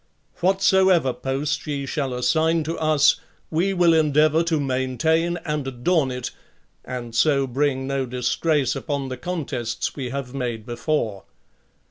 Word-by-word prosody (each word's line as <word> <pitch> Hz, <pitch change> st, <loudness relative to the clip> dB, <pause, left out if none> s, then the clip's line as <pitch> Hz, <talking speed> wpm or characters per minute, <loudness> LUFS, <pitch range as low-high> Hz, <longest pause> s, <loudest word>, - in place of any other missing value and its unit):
Whatsoever 190 Hz, -5 st, +3 dB
post 135 Hz, +5 st, -2 dB
ye 140 Hz, -2 st, -2 dB
shall 135 Hz, -1 st, -2 dB
assign 160 Hz, +5 st, +2 dB
to 165 Hz, +2 st, -3 dB
us, 155 Hz, -2 st, +4 dB, 0.3 s
we 175 Hz, +5 st, +1 dB
will 175 Hz, -3 st, +4 dB
endeavour 155 Hz, 0 st, +4 dB
to 165 Hz, -2 st, +1 dB
main 130 Hz, -2 st, -1 dB
tain 165 Hz, +3 st, +2 dB
and 150 Hz, -3 st, -2 dB
adorn 135 Hz, +4 st, +1 dB
it, 125 Hz, -1 st, -4 dB, 0.5 s
and 120 Hz, -2 st, -6 dB
so 140 Hz, +3 st, +3 dB
bring 135 Hz, +1 st, 0 dB
no 135 Hz, -1 st, -1 dB
disgrace 130 Hz, +3 st, 0 dB
upon 140 Hz, -3 st, -3 dB
the 130 Hz, -, -5 dB
contests 135 Hz, -10 st, -3 dB
we 130 Hz, -4 st, -4 dB
have 135 Hz, -1 st, -5 dB
made 120 Hz, -5 st, -3 dB
before... 120 Hz, -5 st, -2 dB
140 Hz, 140 wpm, -23 LUFS, 130-160 Hz, 0.5 s, us